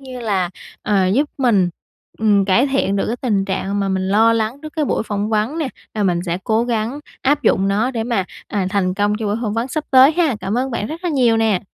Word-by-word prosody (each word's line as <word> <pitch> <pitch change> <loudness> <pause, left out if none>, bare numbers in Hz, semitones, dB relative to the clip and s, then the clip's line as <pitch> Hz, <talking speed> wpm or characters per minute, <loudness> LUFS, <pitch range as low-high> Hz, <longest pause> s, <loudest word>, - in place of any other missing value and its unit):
như 260 -2 -8
là, 195 -6 -1 0.3
ờ, 195 -3 +2
giúp 280 +10 +1
mình, 215 -9 +3 0.5
ừm, 205 -3 +3
cải 205 +8 +3
thiện 265 -8 0
được 195 - 0
cái 235 - -2
tình 215 -6 0
trạng 195 +1 -2
mà 195 - 0
mình 190 0 -1
lo 220 +3 +4
lắng 225 +3 -1
trước 310 - -8
cái 310 - +1
buổi - - 0
phỏng 210 -1 -3
vấn 220 +8 0
nè. 310 -4 -1 0.3
Và 215 - -1
mình 175 -3 +1
sẽ 170 +1 -1
cố 220 +1 +1
gắng 235 +3 -2 0.2
áp 290 +2 +2
dụng 195 -4 +2
nó, 215 +6 +1
để 230 -3 -3
mà, 230 -5 0 0.2
à, 200 -3 -2
thành 185 -2 0
công 205 +1 +1
cho 220 - -3
buổi 205 +1 0
phỏng 215 -3 -1
vấn 230 +3 -1
sắp 310 +3 -3
tới 265 +3 +7
ha. 315 -8 +1
Cảm 205 +5 -1
ơn 265 +1 -1
bạn 230 -3 -2
rất 325 +8 -7
là - - +1
nhiều 245 -6 +3
nè. 220 -4 +1
220 Hz, 250 wpm, -19 LUFS, 200-255 Hz, 0.5 s, tới